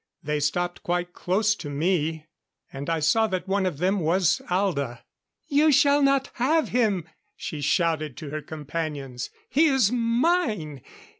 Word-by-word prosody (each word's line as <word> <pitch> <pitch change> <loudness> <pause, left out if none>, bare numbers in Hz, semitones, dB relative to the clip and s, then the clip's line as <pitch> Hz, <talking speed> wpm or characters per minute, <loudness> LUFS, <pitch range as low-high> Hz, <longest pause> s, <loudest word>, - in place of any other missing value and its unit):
They 150 0 -1
stopped 175 +5 -1
quite 175 0 -2
close 210 +4 +1
to 165 -7 -7
me; 160 +1 -1 0.5
and 140 +3 -5
I 165 -1 +1
saw 220 +9 +3
that 185 -2 -3
one 195 0 +1
of 170 -6 -3
them 190 +5 +1
was 175 +2 +2
Alda. 155 -10 -1 0.4
"You 300 +1 +4
shall 285 0 +4
not 275 -1 +2
have 305 +6 +2
him!" 205 -9 +1 0.3
she 150 -3 -6
shouted 155 -2 0
to 150 -3 -7
her 155 0 -4
companions. 150 -4 -5 0.2
"He 310 +4 +3
is 265 -8 +3
mine! 230 - 0
180 Hz, 150 wpm, -25 LUFS, 150-230 Hz, 0.5 s, You